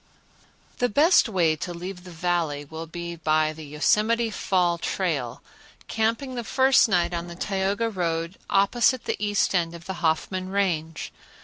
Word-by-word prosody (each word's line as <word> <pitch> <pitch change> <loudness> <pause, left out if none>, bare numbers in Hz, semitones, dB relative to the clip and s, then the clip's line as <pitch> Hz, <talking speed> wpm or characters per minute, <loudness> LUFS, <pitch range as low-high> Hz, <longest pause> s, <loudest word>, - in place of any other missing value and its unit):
The 245 - +2
best 295 - +4
way 170 -6 +2
to 175 +3 -5
leave 180 +1 -7
the - - -9
Valley 165 -4 -1
will 160 +3 -8
be 170 +1 -6
by 155 -1 +1
the 160 0 -10
Yosemite 215 +10 +1
Fall 180 -4 +1
trail, 155 -11 -2 0.4
camping 230 +4 -1
the 240 -1 -4
first 260 +2 +4
night 175 -2 +1
on 170 0 -3
the 170 - -8
Tioga 195 +4 -1
road 170 -3 -2
opposite 235 +5 +3
the - - -1
east 205 -1 +1
end 170 -2 0
of 170 0 -12
the 190 - -4
Hoffman 185 +3 0
Range. 165 -5 -2
180 Hz, 155 wpm, -25 LUFS, 165-205 Hz, 0.4 s, best